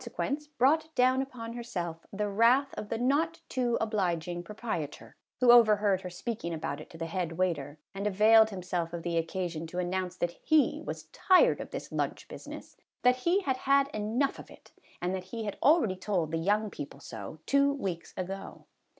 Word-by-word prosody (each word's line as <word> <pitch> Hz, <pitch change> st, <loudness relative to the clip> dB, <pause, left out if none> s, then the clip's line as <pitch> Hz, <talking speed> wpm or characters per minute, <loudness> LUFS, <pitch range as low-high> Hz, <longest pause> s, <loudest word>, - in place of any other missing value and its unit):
149 255 Hz, +3 st, -2 dB
quence, 295 Hz, -1 st, -18 dB
brought 315 Hz, +5 st, +2 dB
down 255 Hz, +1 st, +4 dB
upon 235 Hz, -4 st, -6 dB
herself 175 Hz, -9 st, -5 dB
the 210 Hz, +1 st, -2 dB
wrath 235 Hz, +7 st, +3 dB
of 210 Hz, -, -6 dB
the 230 Hz, -, -1 dB
not 300 Hz, +7 st, +1 dB
too 245 Hz, -2 st, 0 dB
obliging 175 Hz, -6 st, -1 dB
proprietor, 205 Hz, -7 st, -5 dB, 0.2 s
who 250 Hz, -1 st, +7 dB
overheard 210 Hz, -5 st, +5 dB
her 180 Hz, -, -6 dB
speaking 180 Hz, -2 st, -4 dB
about 145 Hz, -2 st, -4 dB
it -, -, -12 dB
to 165 Hz, -, -12 dB
the 165 Hz, -, -3 dB
head 170 Hz, 0 st, -3 dB
waiter, 165 Hz, -5 st, -1 dB, 0.2 s
and 200 Hz, +1 st, -2 dB
availed 220 Hz, +2 st, +6 dB
himself 180 Hz, -4 st, -3 dB
of 170 Hz, -1 st, -5 dB
the 170 Hz, -1 st, -2 dB
occasion 165 Hz, -1 st, -2 dB
to 175 Hz, -, -8 dB
announce 180 Hz, 0 st, -2 dB
that 175 Hz, -1 st, -2 dB
he 310 Hz, -2 st, +3 dB
was -, -, -5 dB
tired 380 Hz, +7 st, +4 dB
of -, -, -7 dB
this -, -, -7 dB
lunch -, -, -2 dB
business, -, -, -10 dB, 0.3 s
that 250 Hz, 0 st, +5 dB
he 345 Hz, +9 st, +2 dB
had 265 Hz, -8 st, -1 dB
had 275 Hz, +1 st, +3 dB
enough 230 Hz, +5 st, -1 dB
of -, -, -11 dB
it, -, -, -17 dB, 0.3 s
and 180 Hz, +1 st, 0 dB
that 185 Hz, -1 st, -4 dB
he 225 Hz, +4 st, -5 dB
had 205 Hz, -2 st, -4 dB
already 290 Hz, -, +4 dB
told 185 Hz, -4 st, -1 dB
the 165 Hz, -, -1 dB
young 205 Hz, +4 st, +1 dB
people 140 Hz, -1 st, -8 dB
so, 110 Hz, 0 st, -8 dB
two 280 Hz, 0 st, +3 dB
weeks 195 Hz, -12 st, -4 dB
ago. 190 Hz, +1 st, -6 dB
205 Hz, 190 wpm, -30 LUFS, 175-250 Hz, 0.3 s, who